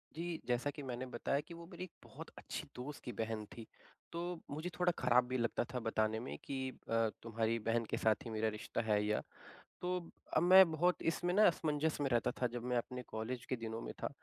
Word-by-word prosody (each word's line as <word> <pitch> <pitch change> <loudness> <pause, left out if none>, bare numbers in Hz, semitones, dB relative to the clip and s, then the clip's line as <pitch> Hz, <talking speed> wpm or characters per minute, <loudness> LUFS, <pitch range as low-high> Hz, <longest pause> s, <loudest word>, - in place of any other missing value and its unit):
जी। 170 0 -3
जैसा 125 +3 +1
कि 145 - -6
मैंने 130 0 -3
बताया 140 +4 +1
कि 170 - -8
वो 170 0 -9
मेरी 180 +1 -6
एक 180 - -8
बहुत - - -9
अच्छी - - -5
दोस्त 135 +4 -6
की 125 - -4
बहन 110 -1 -2
थी, 115 +1 -10 0.5
तो 175 0 -3
मुझे 155 +5 -3
थोड़ा 180 0 +4
ख़राब 125 0 +5
भी 130 0 0
लगता 120 0 +1
था 125 - 0
बताने 110 0 +2
में 125 - -5
कि 135 -1 -3 0.3
अ, 115 -1 +3
तुम्हारी 115 0 0
बहन 115 0 +2
के - - 0
साथ 110 +4 +2
ही - - -4
मेरा 110 0 +1
रिश्ता 115 - -2
है। 105 -2 +2
या 105 0 +1 0.6
तो 180 - -1 0.5
अब 160 - +4
मैं 185 -1 +9
बहुत 175 +3 +2
इसमें 175 +1 -1
ना 210 +2 +7
असमंजस 155 -2 +1
में 135 - +2
रहता 120 -2 +2
था, 125 - +4
जब 120 0 -5
मैं 125 -1 +1
अपने 125 +1 -3
कॉलेज 120 +3 -4
के 130 - -1
दिनों 115 +1 -3
में - - -5
था, - - +1
125 Hz, 225 wpm, -37 LUFS, 115-160 Hz, 0.6 s, मैं